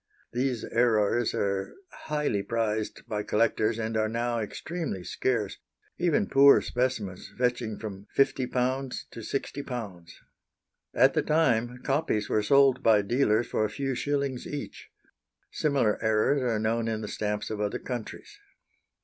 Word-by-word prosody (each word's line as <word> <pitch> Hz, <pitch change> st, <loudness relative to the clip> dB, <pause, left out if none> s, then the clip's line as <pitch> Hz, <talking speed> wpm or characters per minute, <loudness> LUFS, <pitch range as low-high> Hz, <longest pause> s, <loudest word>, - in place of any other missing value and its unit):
These 125 Hz, -2 st, -1 dB
errors 115 Hz, -1 st, +2 dB
are 100 Hz, -1 st, -1 dB, 0.2 s
highly 150 Hz, -9 st, -2 dB
prized 110 Hz, 0 st, -2 dB
by 105 Hz, -1 st, -2 dB
collectors, 110 Hz, +1 st, +1 dB
and 110 Hz, 0 st, -3 dB
are 110 Hz, 0 st, +1 dB
now 120 Hz, +1 st, -1 dB
extremely 125 Hz, -, -4 dB
scarce, 110 Hz, -1 st, -1 dB, 0.4 s
even 180 Hz, +5 st, +2 dB
poor 140 Hz, -3 st, +7 dB
specimens 120 Hz, -7 st, -2 dB
fetching 120 Hz, -3 st, 0 dB
from 100 Hz, -2 st, -8 dB
£50 130 Hz, -1 st, 0 dB
to -, -, -9 dB
£60. 115 Hz, -8 st, -5 dB, 0.8 s
At -, -, +5 dB
the -, -, +2 dB
time, 125 Hz, -6 st, +1 dB
copies 135 Hz, -7 st, 0 dB
were 105 Hz, -, +2 dB
sold 135 Hz, +4 st, +4 dB
by 105 Hz, -2 st, +4 dB
dealers 120 Hz, 0 st, +2 dB
for -, -, -1 dB
a 105 Hz, -, 0 dB
few 135 Hz, +5 st, -2 dB
shillings 140 Hz, -1 st, -2 dB
each. 145 Hz, -1 st, -7 dB, 0.6 s
Similar 135 Hz, -8 st, +1 dB
errors 110 Hz, +6 st, +2 dB
are 120 Hz, -3 st, 0 dB
known 115 Hz, +2 st, 0 dB
in 110 Hz, -1 st, -2 dB
the 105 Hz, -, -5 dB
stamps 105 Hz, +1 st, -3 dB
of 105 Hz, -1 st, -3 dB
other 105 Hz, -1 st, -1 dB
countries. 130 Hz, -, -7 dB
115 Hz, 135 wpm, -28 LUFS, 105-135 Hz, 0.8 s, poor